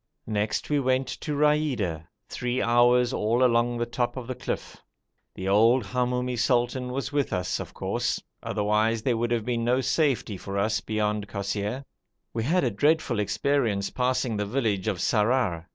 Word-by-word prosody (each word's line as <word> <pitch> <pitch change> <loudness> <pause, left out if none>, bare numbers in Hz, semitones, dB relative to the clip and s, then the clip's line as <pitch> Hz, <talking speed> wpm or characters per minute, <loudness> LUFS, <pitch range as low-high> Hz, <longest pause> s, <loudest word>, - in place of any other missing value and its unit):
Next 105 0 -1
we 145 - +3
went 130 -1 +1
to 150 +3 -4
Raida, 135 - +1 0.2
three 125 +1 -2
hours 120 +1 +4
all 115 +4 +1
along 120 0 +2
the 120 - 0
top 120 +1 -2
of 130 - -5
the 130 - -4
cliff; 125 - -5 0.6
the 95 - -5
old 115 +5 +4
Hamoumi 125 +2 -1
sultan 125 +1 +1
was 135 +2 -3
with 145 -1 0
us, 90 -1 -1
of - - -8
course, - - -1 0.2
otherwise 105 +2 0
there 125 -2 +1
would 120 +1 0
have 115 -2 0
been 120 -2 -1
no 125 +2 +2
safety 130 - 0
for 100 +2 -5
us 105 0 +1
beyond 105 -1 -1
Kosseir. 105 +6 -3 0.5
We 115 - -1
had 180 +6 +2
a 125 - +1
dreadful 145 +1 +1
experience 110 -2 0
passing 125 -3 0
the 105 - -1
village 110 -5 -1
of 105 -4 0
Sarrar. 105 -3 +1
120 Hz, 170 wpm, -26 LUFS, 105-130 Hz, 0.6 s, hours